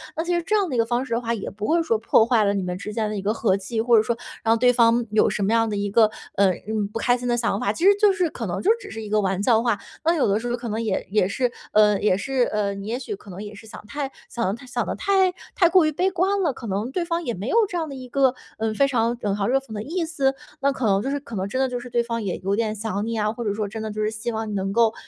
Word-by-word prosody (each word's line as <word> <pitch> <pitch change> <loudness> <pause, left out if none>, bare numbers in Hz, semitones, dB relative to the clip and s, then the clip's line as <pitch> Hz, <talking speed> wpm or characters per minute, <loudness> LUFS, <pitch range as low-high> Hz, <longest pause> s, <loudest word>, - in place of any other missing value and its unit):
那 325 - -1
其 350 0 -1
实 345 - +1
这 430 +5 0
样 395 -5 +1
的 255 - -2
一 - - 0
个 230 - +3
方 240 +2 0
式 235 - -4
的 230 - +1
话， 230 0 -1
也 205 - -4
不 210 +1 -6
会 335 +1 +3
说 230 -8 +1
破 220 0 +4
坏 230 -3 +3
了 200 - +2
你 195 -2 -1
们 180 0 -3
之 210 +2 -6
间 215 -1 -1
的 215 - -3
一 195 - -3
个 205 +3 0
和 200 -4 +1
气， 220 +4 -3
或 235 -1 +5
者 215 - +5
说 235 +1 0 0.3
让 225 0 +3
对 245 +1 +5
方 235 -1 +3
有 215 - +4
什 - - -3
么 200 - +1
样 225 -1 +3
的 210 - -2
一 200 0 -1
个， 215 0 +5 0.3
呃， 195 -1 +4 0.2
嗯， 215 -2 -1
不 225 - -4
开 245 +1 +2
心 245 0 -5
的 240 - +2
想 225 -3 0
法， 205 - 0
其 335 - -5
实 400 0 +7
就 415 -2 +6
是 365 -3 0
可 235 -6 -6
能 175 - -3
就 400 - +1
只 - - -10
是 220 - -6
一 215 - -7
个 215 0 +2
玩 190 0 0
笑 225 -1 +4
话。 235 -4 +1 0.2
那 330 +2 +3
有 305 - +2
的 200 +1 +2
时 240 +1 -4
候 240 - 0
可 240 0 -7
能 220 +2 -2
也 215 -4 -2
也 210 -3 +3
是， 245 +5 0 0.2
呃， 210 -1 +5
也 195 -3 +3
是， 265 +3 0
呃， 205 -2 0
你 200 +1 -7
也 240 +3 -2
许 420 - -5
可 210 - -16
能 185 - -8
也 205 - -8
是 220 - -13
想 210 - -10
太 280 +2 -4 0.2
想 235 - -2
得 190 - 0
太 240 +4 -9
想 250 - -2
得 - - -2
太 380 -2 +2 0.2
太 345 -3 +4
过 355 -2 +5
于 310 - +2
悲 365 +6 +1
观 385 +3 +1
了， 320 -7 +1
可 235 - -8
能 205 +5 -2
对 340 +4 -1
方 335 0 -2
也 240 - -2
没 195 +6 -5
有 - - 0
这 360 - -4
样 320 -2 -2
的 275 - -7
一 255 -1 -8
个， 265 -1 +3 0.3
嗯， 220 -1 0
非 275 +4 +4
常 235 -2 0
冷 200 -1 0
嘲 200 0 -1
热 265 +2 +3
讽 270 -4 -17
的 210 - -4
意 340 +7 -2
思， 275 -4 0 0.3
那 280 0 +3
可 260 -3 -3
能 195 -1 +3
就 265 - -2
是 285 0 -1
可 235 -5 -9
能 190 +1 -2
真 255 +6 -3
的 265 - +2
就 245 - -3
是 245 +1 -9
对 240 0 +1
方 230 -1 -3
也 190 - -2
有 195 +2 -1
点 220 -1 -1
想 210 -1 -3
你 230 0 -2
啊， 215 0 +1
或 235 - -5
者 205 - 0
说 210 0 -2
真 220 +2 -6
的 215 - -4
就 215 +1 -4
是 215 - +1
希 230 +2 -4
望 220 -1 -3
你 - - -4
能 195 0 -1
够， 230 -1 +4
230 Hz, 360 characters per minute, -23 LUFS, 210-270 Hz, 0.3 s, 实